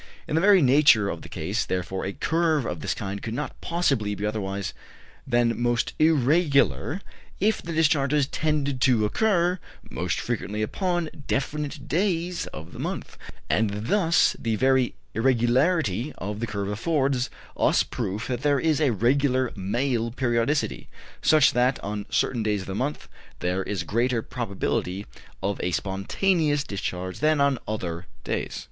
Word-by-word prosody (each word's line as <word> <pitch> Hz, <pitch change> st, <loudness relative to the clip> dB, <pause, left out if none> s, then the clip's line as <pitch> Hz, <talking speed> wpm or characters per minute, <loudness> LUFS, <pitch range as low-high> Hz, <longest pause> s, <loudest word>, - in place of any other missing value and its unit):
In -, -, -4 dB
the 160 Hz, -, +3 dB
very 195 Hz, -3 st, +6 dB
nature 130 Hz, -6 st, +5 dB
of -, -, -4 dB
the -, -, -11 dB
case, -, -, -2 dB
therefore, 95 Hz, +1 st, -3 dB
a 100 Hz, -, -3 dB
curve 160 Hz, -, +1 dB
of 90 Hz, -, -3 dB
this -, -, -2 dB
kind 100 Hz, 0 st, -5 dB
could 115 Hz, 0 st, -4 dB
not 150 Hz, +3 st, -5 dB
possibly 135 Hz, -12 st, 0 dB
be 100 Hz, -, -3 dB
otherwise 100 Hz, -2 st, -3 dB, 0.5 s
than 120 Hz, -1 st, +2 dB
most 120 Hz, -1 st, +1 dB
irregular 155 Hz, +2 st, +3 dB, 0.4 s
if 215 Hz, +2 st, +2 dB
the 170 Hz, -, -6 dB
discharges 150 Hz, -3 st, +3 dB
tended 140 Hz, -3 st, -1 dB
to 120 Hz, -5 st, +4 dB
occur 180 Hz, -, +2 dB, 0.3 s
most -, -, -2 dB
frequently 110 Hz, -3 st, -2 dB
upon 175 Hz, -, -1 dB, 0.2 s
definite 145 Hz, +1 st, -2 dB
days 175 Hz, 0 st, 0 dB
of 80 Hz, +2 st, -9 dB
the -, -, -10 dB
month; -, -, -4 dB, 0.3 s
and 105 Hz, 0 st, 0 dB
thus 180 Hz, -4 st, +3 dB
the 115 Hz, -1 st, -1 dB
very 130 Hz, +1 st, +2 dB, 0.2 s
irregularity 125 Hz, -, +2 dB
of 105 Hz, +2 st, -4 dB
the 115 Hz, -, -2 dB
curve 100 Hz, -2 st, -3 dB
affords 135 Hz, +3 st, 0 dB, 0.3 s
us -, -, +3 dB
proof 105 Hz, +6 st, -4 dB
that 125 Hz, -1 st, -2 dB
there 145 Hz, -1 st, +2 dB
is 160 Hz, 0 st, +1 dB
a 145 Hz, -, +4 dB
regular 130 Hz, +3 st, +2 dB
male 115 Hz, +4 st, -1 dB
periodicity, 120 Hz, +3 st, 0 dB, 0.3 s
such 150 Hz, -2 st, +5 dB
that 125 Hz, +2 st, +2 dB
on 105 Hz, +1 st, -4 dB
certain 120 Hz, -, +1 dB
days 105 Hz, -2 st, 0 dB
of 95 Hz, -, -9 dB
the 95 Hz, -, -4 dB
month 130 Hz, +8 st, -3 dB, 0.3 s
there 90 Hz, +2 st, -1 dB
is 95 Hz, -2 st, -3 dB
greater 115 Hz, +5 st, 0 dB
probability 100 Hz, -4 st, -2 dB, 0.4 s
of 100 Hz, 0 st, -1 dB
a 90 Hz, -, 0 dB
spontaneous 145 Hz, -, 0 dB
discharge 95 Hz, -3 st, -4 dB
than 155 Hz, 0 st, +3 dB
on 140 Hz, 0 st, +4 dB
any -, -, -14 dB
other 90 Hz, -4 st, -4 dB, 0.2 s
days. -, -, -3 dB
125 Hz, 155 wpm, -25 LUFS, 105-150 Hz, 0.5 s, very